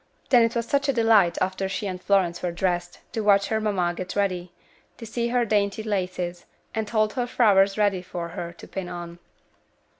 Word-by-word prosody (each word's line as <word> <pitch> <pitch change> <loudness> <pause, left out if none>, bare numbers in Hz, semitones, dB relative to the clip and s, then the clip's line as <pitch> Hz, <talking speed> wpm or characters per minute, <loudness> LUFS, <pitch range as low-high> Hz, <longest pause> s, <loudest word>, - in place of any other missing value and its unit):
Then 245 -2 +7
it 230 +1 +2
was 235 -1 0
such 280 0 +1
a - - +3
delight, 225 -7 +4
after 190 +1 -1
she 195 - -3
and 185 -2 -4
Florence 185 -4 +1
were 180 - -1
dressed, 175 0 -2 0.2
to 225 - -1
watch 200 -1 +4
her 220 -1 0
mamma 185 -5 0
get 185 +1 -6
ready; 185 -3 -1 0.5
to 230 - -8
see 235 +1 -2
her 240 0 +1
dainty 205 0 0
laces, 180 -4 -3 0.3
and 220 -1 -2
hold 215 -2 +1
her 245 -2 -1
flowers 200 -5 +4
ready 200 -3 +2
for 175 -1 -6
her 170 0 -6
to 170 - -13
pin 190 -2 -5
on. 175 -1 -7
195 Hz, 200 wpm, -25 LUFS, 180-220 Hz, 0.5 s, Then